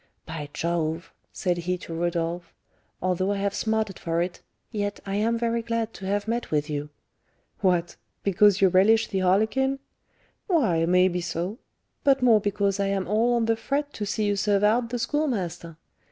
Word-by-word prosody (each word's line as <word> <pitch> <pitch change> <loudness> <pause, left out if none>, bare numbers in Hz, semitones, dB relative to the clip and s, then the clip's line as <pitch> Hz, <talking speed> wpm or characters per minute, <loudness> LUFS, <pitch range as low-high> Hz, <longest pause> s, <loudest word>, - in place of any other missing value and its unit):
"By 155 -2 -6
Jove," 165 0 -2 0.2
said 180 -2 -1
he 180 +1 -2
to 170 - -8
Rodolph, 170 0 -2 0.5
"although 185 +1 +1
I - - -2
have 200 0 -1
smarted 220 -3 -1
for 165 0 -1
it, 175 +1 -2 0.3
yet 205 -2 -2
I 195 0 -2
am 230 +2 +1
very 235 0 0
glad 230 -1 -2
to 190 - -7
have 205 +1 -1
met 235 +1 -2
with 150 0 -1
you." 145 0 -3 0.7
"What! 180 -4 +1 0.3
because 200 +1 +4
you 190 - +6
relish 215 +5 +4
the 195 - -1
harlequin?" 220 +9 +2 0.7
"Why, 205 - +2
may 180 +1 +5
be 180 -1 -2
so; 175 +5 -3 0.4
but 270 -2 +3
more 225 -4 +6
because 200 -1 0
I 200 - +1
am 195 -1 -1
all 225 +5 +2
on 235 -1 +1
the 225 0 +2
fret 285 +5 -2
to 210 - -4
see 215 +2 -1
you 205 0 +1
'serve 200 0 +1
out' 230 +3 +3
the 245 - -2
Schoolmaster. 210 - -2
200 Hz, 180 wpm, -25 LUFS, 175-225 Hz, 0.7 s, you